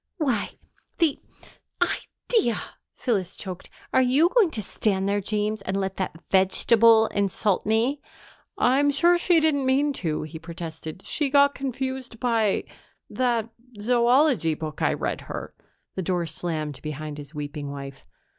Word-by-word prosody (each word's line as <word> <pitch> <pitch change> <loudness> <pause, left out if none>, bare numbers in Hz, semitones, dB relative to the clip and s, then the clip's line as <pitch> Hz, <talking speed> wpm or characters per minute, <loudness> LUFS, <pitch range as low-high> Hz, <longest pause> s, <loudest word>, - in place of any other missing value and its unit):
"Why, 265 - 0 0.4
the 325 -4 +2 0.6
idea!" 410 - 0 0.4
Phyllis 195 -8 -1
choked. 185 -2 -8 0.2
"Are 260 - +5
you 270 +7 +4
going 440 -4 +4
to 225 - -4
stand 195 0 0
there, 205 0 +1
James, 210 +1 -1
and 195 0 -2
let 190 -1 -2
that 185 -4 -3
vegetable 220 +4 +5
insult 200 0 0
me?" 235 +6 +1 0.6
"I'm 275 +3 +3
sure 345 +5 +4
she 345 -1 +4
didn't 310 -3 +2
mean 275 +3 +2
to," 155 -4 -1
he 155 +1 -8
protested. 165 +1 -8
"She 295 -3 +1
got 280 0 +5
confused 260 -2 -4
by 230 -5 +1 0.5
that 235 -3 0 0.3
zoology 240 - +3
book 155 -1 -6
I - - +3
read - - -3
her." - - -7 0.4
The 190 - -3
door 180 -1 -1
slammed 155 -2 -4
behind 150 0 -6
his 145 +2 -10
weeping 145 -1 -5
wife. 140 -1 -8
215 Hz, 140 wpm, -25 LUFS, 170-265 Hz, 0.6 s, Are